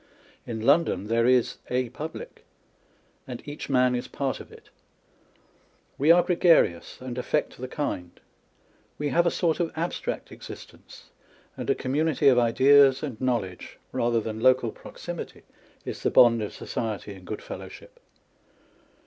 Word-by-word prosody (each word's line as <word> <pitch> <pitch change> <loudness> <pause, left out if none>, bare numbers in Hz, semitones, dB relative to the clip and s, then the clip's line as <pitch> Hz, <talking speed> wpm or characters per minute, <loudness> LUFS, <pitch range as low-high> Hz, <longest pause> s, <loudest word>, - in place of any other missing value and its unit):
In 110 -2 -4
London 140 - +2
there 115 +1 +2
is 125 -2 +3
a 125 -1 0
public; 155 +6 -8 0.8
and 125 +2 -8
each 145 +1 -7
man 125 -2 +3
is 125 +1 -3
part 135 -2 -3
of - - -12
it. - - -16 1.3
We 145 +4 +2
are 175 +1 +7
gregarious, 170 - +3
and 130 -1 -6
atfeet 150 +4 -1
the 130 - -6
kind. 95 - -4 0.8
We 145 0 -2
have 170 +4 +3
a - - +5
sort 165 -2 0
of 170 -2 0
abstract 165 +2 -3
existence; - - -12 0.4
and - - -6
a - - +3
community 145 +2 0
of 125 -2 +5
ideas 135 +3 +5
and 135 -6 -5
knowledge 115 -8 -2
(rather 120 0 +1
than 110 0 -5
local 125 -1 +3
proximity) - - -8 0.4
is - - -6
the - - +1
bond 115 -2 +6
of 105 - -4
society 110 -2 -4
and 95 -1 -13
good 90 - -6
fellow - - -8
ship. - - -15
130 Hz, 150 wpm, -26 LUFS, 115-150 Hz, 1.3 s, are